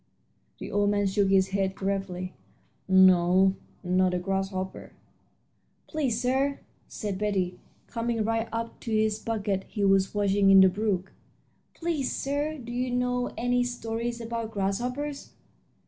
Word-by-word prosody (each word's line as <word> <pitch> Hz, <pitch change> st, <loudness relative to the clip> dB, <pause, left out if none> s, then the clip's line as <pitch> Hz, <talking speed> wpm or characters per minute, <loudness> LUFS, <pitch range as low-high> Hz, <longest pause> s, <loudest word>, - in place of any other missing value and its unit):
The -, -, -7 dB
old 205 Hz, 0 st, +2 dB
man 205 Hz, 0 st, +1 dB
shook 195 Hz, 0 st, +2 dB
his 190 Hz, -1 st, +4 dB
head 195 Hz, -1 st, -1 dB
gravely. 190 Hz, -2 st, -3 dB, 0.5 s
"No, 190 Hz, 0 st, +5 dB, 0.3 s
not 185 Hz, 0 st, +2 dB
a -, -, +1 dB
grasshopper." 190 Hz, +1 st, -3 dB, 0.9 s
"Please, 270 Hz, -8 st, -1 dB
sir," 265 Hz, +3 st, 0 dB, 0.3 s
said 205 Hz, -4 st, -4 dB
Betty, 190 Hz, -4 st, -1 dB, 0.3 s
coming 230 Hz, -1 st, -2 dB
right 225 Hz, +1 st, -1 dB
up 230 Hz, 0 st, -4 dB
to -, -, -7 dB
the 215 Hz, -1 st, +1 dB
bucket 205 Hz, -4 st, -1 dB
he 205 Hz, -2 st, -1 dB
was 195 Hz, 0 st, +3 dB
washing 200 Hz, -1 st, +3 dB
in 195 Hz, 0 st, +8 dB
the 190 Hz, -, +7 dB
brook 195 Hz, -1 st, -1 dB, 0.6 s
"please, 325 Hz, -6 st, -1 dB
sir, 290 Hz, +3 st, -2 dB
do 240 Hz, -3 st, -8 dB
you 250 Hz, +1 st, -1 dB
know 250 Hz, 0 st, 0 dB
any 245 Hz, +1 st, +1 dB
stories 235 Hz, -1 st, -3 dB
about 230 Hz, -1 st, -4 dB
grasshoppers?" 250 Hz, +8 st, -3 dB
210 Hz, 135 wpm, -27 LUFS, 190-240 Hz, 0.9 s, in